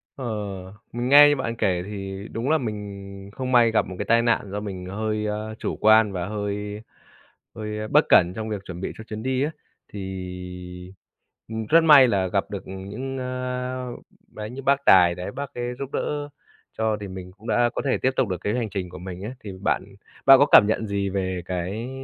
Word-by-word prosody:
Ờ, 130 - -6 0.7
mình 120 +2 -2
nghe 145 +1 +9
như 145 - +3
bạn 115 -3 -3
kể 90 -5 0
thì 100 0 -6
đúng 120 +5 -2
là 160 - +4
mình 100 -4 -6
không 130 -1 -4
may 120 -2 +5
gặp 110 - +2
một 95 - -7
cái - - -2
tai 115 +1 +4
nạn 115 -1 +2
do 105 - -3
mình 95 -3 -6
hơi, 105 +2 -2
a, 110 +1 -4
chủ - - -3
quan 110 -1 +6
và 90 -1 -3
hơi 105 0 -4 0.7
hơi 105 0 -4
bất - - +4
cẩn 90 +1 +6
trong 110 0 -4
việc 105 -3 -3
chuẩn 90 -1 -7
bị - - -3
cho 110 - -8
chuyến 110 0 -7
đi 130 0 0
á. 155 - -1 0.4
Thì, 90 -1 -7 0.6
ừm, 110 -1 -4
rất 165 +1 +6
may 145 -5 +8
là 95 -4 +1
gặp 100 +2 -1
được, 100 - -5
ừm, 95 +1 -8
những 135 +5 -5
a, 125 0 -3 0.5
đấy, 105 0 -6
như 135 +2 -7
bác 140 +1 +3
tài 90 -2 +6
đấy 90 0 -5
bác 140 +1 -6
ấy 120 0 -3
giúp 140 -1 -5
đỡ 145 0 -2 0.5
cho 110 -1 +1
thì 100 - -5
mình 95 -1 -8
cũng 110 - -13
đã 120 0 +3
có - - -1
thể 135 - +2
tiếp 130 - +2
tục 130 -5 +2
được 90 - -2
cái 105 +3 -1
hành 115 -4 -2
trình 95 -3 -4
của 90 - -10
mình 90 +1 -7
ấy. 115 - -4
Thì 100 - -8
bạn 100 - 0 0.4
bạn 135 -1 +9
có 145 - +6
cảm - - +10
nhận 110 0 0
gì 100 -1 -1
về 95 -2 -2
cái, 95 +7 -3
105 Hz, 220 wpm, -24 LUFS, 95-125 Hz, 0.7 s, cảm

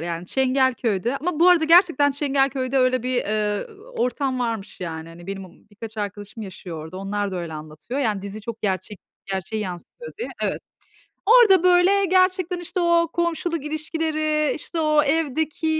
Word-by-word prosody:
Yani, 170 +1 -4
Çengelköy'de 255 -3 +1
ama 325 +1 -3
bu 360 - +7
arada 340 -3 +5
gerçekten 330 -4 +5
Çengelköy'de 270 -2 0
öyle 255 -1 +2
bir, 255 0 -1
eee, 210 -2 -1 0.3
ortam 255 - -1
varmış 225 -6 -3
yani. 165 -2 -5
Hani, 170 +2 -13
benim, 195 0 -5
m 185 - -11 0.2
birkaç 220 +1 -9
arkadaşım 205 +1 -5
yaşıyor 175 -5 -8
orada, 160 +3 -9
onlar 200 +1 -3
da - - -3
öyle 170 -2 -5
anlatıyor. 155 - -6
Yani, 215 -7 0
dizi 200 +2 -6
çok 225 0 -7
gerçek 190 0 -2 0.3
gerçeği 195 +3 -3
yansıtıyor 185 - -8
diye. 470 - -4
Evet. - - -1 0.7
Orada 430 -6 +7
böyle 365 +2 +5
gerçekten 370 -1 +2
işte 360 +2 -3
o 340 -1 +3
komşuluk 340 -2 -1
ilişkileri, 310 0 -1
işte 330 +1 -4
o 305 -1 +4
evdeki, 315 +1 0
260 Hz, 160 wpm, -23 LUFS, 200-325 Hz, 0.7 s, bu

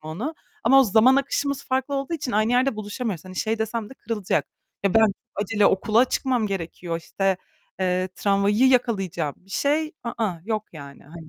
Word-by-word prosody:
onu. 190 - -4 0.3
Ama 270 +4 +7
o - - +5
zaman 230 +5 +5
akışımız 280 0 -1
farklı 265 +2 -1
olduğu 275 +4 -2
için 270 -5 -4
aynı 215 +3 +2
yerde 255 -1 +2
buluşamıyoruz. 210 -3 -4
Hani, 185 0 -10
şey 220 +3 -1
desem 220 0 -3
de - - -10
kırılacak, 220 -7 -2 0.4
"Ya, 200 -2 +1
ben 220 -2 +5 0.2
acele 205 0 +2
okula 215 +5 +3
çıkmam 250 -4 0
gerekiyor, 170 -3 -4
işte, 195 +2 0 0.4
eee, 185 0 +1
tramvayı 205 +5 +3
yakalayacağım." 195 - +1
bir 195 - -24
şey, 305 +7 0
ı 235 - -3
ıh, 175 -3 -4
yok 215 -2 -1
yani, 140 -3 -11
hani 160 +2 -12
215 Hz, 175 wpm, -24 LUFS, 185-255 Hz, 0.4 s, Ama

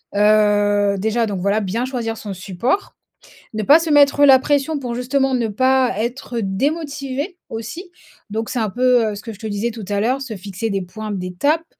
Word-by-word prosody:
Heu, 205 -1 +3
déjà 220 +3 +1
donc 200 -3 -3
voilà, 200 +3 +1
bien 220 +6 -2
choisir 235 -4 -3
son 205 -2 -6
support, 200 - -2 0.6
ne 215 - -2
pas 290 +9 +7
se 330 0 -3
mettre 285 0 +5
la 265 -2 +8
pression 290 +3 0
pour 245 -3 -4
justement 265 +2 0
ne 235 -3 0
pas 260 +2 +2
être 240 +1 -3
démotivé 280 - -2
aussi, 240 - -7 0.4
donc 220 +2 -3
c'est 250 - -2
un 220 -3 0
peu, 245 0 +3
heu, - - -5
ce 200 - -7
que 225 - -7
je - - -15
te 220 - -7
disais 215 +3 -2
tout 220 -3 -8
à 205 -1 0
l'heure 255 +5 0
se 225 -6 -6
fixer 200 +4 -5
des 195 -1 -1
points 215 +4 -7
d'étapes, 200 - -1
230 Hz, 200 wpm, -20 LUFS, 205-265 Hz, 0.6 s, la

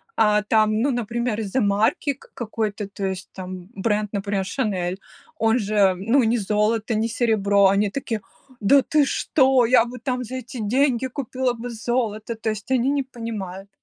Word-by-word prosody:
а 210 -1 +4
там, 215 0 +2
ну, 280 - +2
например, 235 -1 -2
из-за 215 +4 -1
марки 215 +6 +1
к 270 - -20
какой-то, 215 -3 -3
то 200 0 -5
есть 190 0 -5
там 185 -1 -8
бренд, 210 +1 -1
например, 200 -1 -1
"Шанель", 190 -5 -2 0.4
он 225 +2 +2
же, 205 -3 +2
ну, 230 +8 +2
не 230 +2 +2
золото, 215 +2 0
не 220 +2 0
серебро, 205 -4 +3
они 200 +2 +2
такие: 225 -1 -3 0.4
"Да 270 +7 +5
ты 300 +2 +2
что, 265 -2 +3
я 245 0 +5
бы 245 +2 -8
там 250 0 -2
за 250 +2 -7
эти 255 +1 -7
деньги 255 +3 +1
купила 260 -1 -2
бы 240 +1 -6
золото"- 230 -1 -2
то 220 0 -3
есть 215 +2 -5
они 260 0 +2
не 280 -1 +1
понимают. 210 -7 -7
225 Hz, 175 wpm, -23 LUFS, 205-250 Hz, 0.4 s, Да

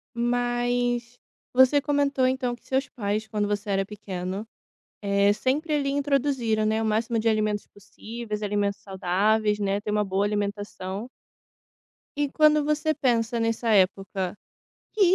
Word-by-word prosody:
Mas, 245 0 0 0.3
você 260 +3 +5
comentou 280 -3 +2
então 255 -2 -1
que - - -28
seus 265 +1 0
pais 215 -1 -2
quando 210 -1 -1
você 205 0 -2
era 195 0 +1
pequeno, 195 0 -5 0.5
eh, 200 0 +3
sempre 290 - -1
ali 280 -2 +1
introduziram, 275 -6 +1
né, 220 +1 +1
o - - -1
máximo 225 +1 0
de 225 +1 +2
alimentos 215 -1 0
possíveis, 215 +1 -7
alimentos 205 -1 -1
saudáveis, 205 +3 +1
né, 200 0 0
ter 210 - -3
uma 210 0 +2
boa 195 +1 0
alimentação. 205 +1 -3 1.1
E 290 - +2
quando 305 -1 +4
você 305 0 +1
pensa 235 -4 +1
nessa 230 0 0
época, 190 0 +1 0.6
que 430 - -6
220 Hz, 140 wpm, -26 LUFS, 205-255 Hz, 1.1 s, você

